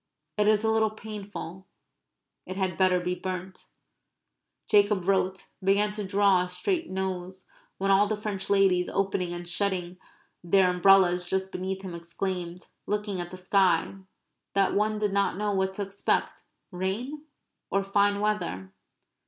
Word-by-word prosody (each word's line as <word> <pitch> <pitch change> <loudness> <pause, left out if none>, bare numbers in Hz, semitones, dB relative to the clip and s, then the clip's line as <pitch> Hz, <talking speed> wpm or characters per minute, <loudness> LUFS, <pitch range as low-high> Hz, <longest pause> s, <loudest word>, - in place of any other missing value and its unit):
It 210 -1 +2
is 215 0 +3
a 220 - +2
little 220 -1 +3
painful. 205 -4 -8 0.8
It 185 - -5
had 190 -1 -1
better 185 -1 +3
be 180 0 -2
burnt. 185 0 -6 1.0
Jacob 205 -3 +3
wrote; 190 -1 0
began 200 +2 +3
to 210 0 -4
draw 195 -1 +3
a 180 - -6
straight 335 - -1
nose; 185 -1 -4 0.3
when 195 +1 +1
all 200 +2 +5
the 215 0 -1
French 205 -2 -4
ladies 195 -3 +3
opening 190 -2 -1
and 175 0 -6
shutting 180 -1 -1 0.4
their 180 +1 +4
umbrellas 180 -1 +4
just 190 0 -1
beneath 190 +1 -4
him 185 -2 -6
exclaimed, 175 +1 -5 0.2
looking 205 -3 -2
at 175 - -6
the 185 - -9
sky, 185 -2 +2 0.6
that 195 -1 +3
one 215 +1 +1
did 210 -2 -1
not 200 -2 +1
know 210 0 -1
what 190 -1 0
to 200 - -3
expect 200 0 -2 0.3
rain 225 +12 -3 0.4
or 195 0 +1
fine 200 +1 +2
weather? 95 - -2
190 Hz, 150 wpm, -27 LUFS, 180-205 Hz, 1.0 s, all